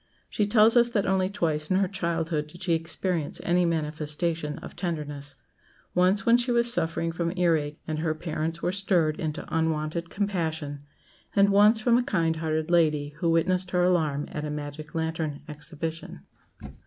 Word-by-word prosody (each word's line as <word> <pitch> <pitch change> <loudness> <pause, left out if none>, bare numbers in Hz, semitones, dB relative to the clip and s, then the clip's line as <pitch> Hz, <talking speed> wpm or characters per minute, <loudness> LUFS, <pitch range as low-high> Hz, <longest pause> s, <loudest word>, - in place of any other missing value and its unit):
She 210 - 0
tells 215 +2 +5
us 240 0 +5
that 210 -4 0
only 190 -1 +1
twice 155 -6 -1
in 185 - +2
her 195 0 +2
childhood 165 -5 -1
did 175 +4 -11
she 175 -2 +1
experience 165 0 -1
any 175 +1 +2
manifestation 155 0 -2
of - - -10
tenderness 145 -5 -3 0.6
once 185 +3 +3
when 235 +1 +6
she 245 +1 0
was 235 0 +5
suffering 165 -3 0
from 170 0 -2
ear 175 -2 +3
ache, 150 0 -4
and 155 -1 -3
her 155 -1 -1
parents 160 +1 -4
were 175 - +1
stirred 180 -5 +1
into 155 0 -4
unwonted 160 +1 -1
compassion, 160 -8 -2 0.5
and 200 0 +5
once 210 +3 +5
from 235 +1 +4
a - - 0
kind 165 -7 0
hearted 160 0 -2
lady 155 -4 +2
who 170 - +1
witnessed 180 +2 +1
her 180 0 +1
alarm 155 -5 +1
at 150 - -4
a 150 - -3
magic 150 +1 -7
lantern 160 -2 -2
exhibition. 155 - -6
165 Hz, 170 wpm, -26 LUFS, 155-185 Hz, 0.6 s, when